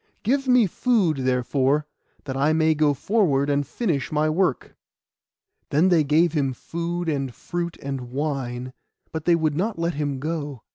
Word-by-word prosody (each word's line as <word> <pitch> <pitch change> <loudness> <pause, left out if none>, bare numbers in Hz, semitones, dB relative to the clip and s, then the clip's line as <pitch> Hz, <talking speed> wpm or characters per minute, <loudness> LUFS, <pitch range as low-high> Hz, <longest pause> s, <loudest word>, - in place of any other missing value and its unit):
Give 270 +4 +1
me 250 -3 +5
food, 195 - +1
therefore, 130 +3 +1 0.4
that 135 -2 -5
I 145 +3 +2
may 160 0 +3
go 150 -2 +2
forward 145 - +1
and 140 -1 0
finish 160 - -2
my 155 0 +1
work.' 175 -5 0 0.9
Then 160 +6 +3
they 170 -4 +4
gave 155 +3 +3
him 140 -4 0
food, 170 +5 -4
and 135 -4 -1
fruit, 170 -1 -4
and 135 -3 -4
wine; 130 -3 -3 0.4
but 160 -1 -5
they 175 - +5
would 155 -3 0
not 200 +6 -1
let 170 +1 -1
him 145 -2 -2
go. 145 -4 -4
155 Hz, 160 wpm, -24 LUFS, 140-170 Hz, 0.9 s, me